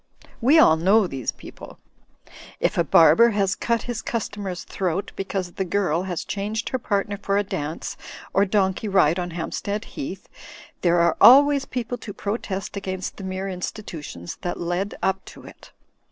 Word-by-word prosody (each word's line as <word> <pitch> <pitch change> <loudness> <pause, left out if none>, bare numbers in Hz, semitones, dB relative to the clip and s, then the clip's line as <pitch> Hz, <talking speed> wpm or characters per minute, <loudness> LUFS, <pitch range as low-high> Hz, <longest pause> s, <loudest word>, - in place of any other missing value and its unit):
We 275 +7 +5
all 160 - +6
know 195 +6 +4
these 135 -8 -3
people. - - -12 0.8
If - - +1
a 170 - +3
barber 170 +9 +6
has 195 -1 +2
cut 235 -1 -1
his 240 -2 -4
customer's 200 -5 -4
throat 185 +1 -3
because 190 -2 -3
the 190 - -3
girl 180 -3 0
has 185 -3 -4
changed 210 +3 -3
her 260 - -2
partner 205 -2 -1
for 200 0 0
a 205 - +2
dance 155 -5 -5 0.4
or 195 - +4
donkey 190 +1 0
ride 185 -4 +3
on 175 0 -3
Hampstead 200 +5 -4
Heath, 295 +2 -7 0.5
there 175 -1 +3
are 170 -1 +3
always 280 +2 +7
people 245 -1 -4
to 205 - -8
protest 200 -1 -4
against 190 -2 -4
the 195 - -8
mere 190 +1 -4
institutions 170 - -6
that 175 - -3
led 175 +4 -2
up 190 0 0
to - - -12
it. - - -14
195 Hz, 165 wpm, -23 LUFS, 175-215 Hz, 0.8 s, always